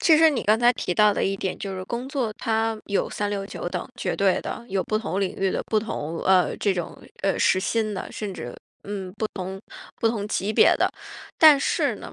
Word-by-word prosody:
其 320 - +6
实 320 0 +7
你 270 -6 -1
刚 215 +2 +3
才 240 0 +5
提 180 - -3
到 210 +2 +4
的 - - -1
一 195 0 0
点 190 -1 -3
就 195 -1 -5
是 185 - -5
工 240 +5 -4
作 255 -6 -2
它 225 0 0
有 200 - 0
三 205 0 -2
六 195 -1 -3
九 - - -5
等， - - -4
绝 - - -2
对 - - +2
的， - - -6
有 190 -1 0
不 215 - -1
同 200 -3 -2
领 195 - -2
域 195 0 +1
的 - - -2
不 215 - +1
同， 165 -7 -4
呃， 185 -1 +3
这 200 -3 +1
种， 175 -2 -5 0.2
呃， 195 - +1
时 185 - +3
薪 215 +1 -1
的， 190 - -6
甚 205 -3 -5
至， 120 0 -7 0.3
嗯， 195 -2 -5
不 220 - -1
同 190 0 -5 0.4
不 225 - +3
同 215 -3 -2
级 210 0 -1
别 - - +6
的。 - - +2 0.5
但 305 -3 +8
是 - - 0
呢， - - -10
205 Hz, 250 characters per minute, -24 LUFS, 190-225 Hz, 0.5 s, 但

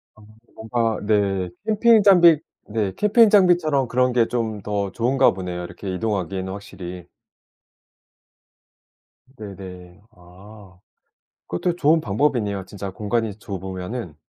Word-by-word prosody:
아 110 - -19 0.3
뭔가 115 0 -1
네 100 -4 0 0.2
캠핑 220 0 +4
장비 175 -6 +6 0.3
네 105 -3 -2
캠핑 215 +1 +4
장비처럼 175 - +3
그런 125 +1 +1
게 120 -2 +3
좀 110 -4 -3
더 100 -2 -3
좋은가 130 +3 +2
보네요 90 -1 -5
이렇게 95 +2 -7
이동하기에는 95 -2 -3
확실히. 90 -3 -9 2.3
네네. 95 -3 -10
아. 95 +1 -16 0.7
그것도 175 0 -2
좋은 160 0 +3
방법이네요 105 -5 -1
진짜 100 -1 -7
공간이 105 +2 -2
좁으면은. 95 -1 -6
105 Hz, 250 characters per minute, -22 LUFS, 95-130 Hz, 2.3 s, 장비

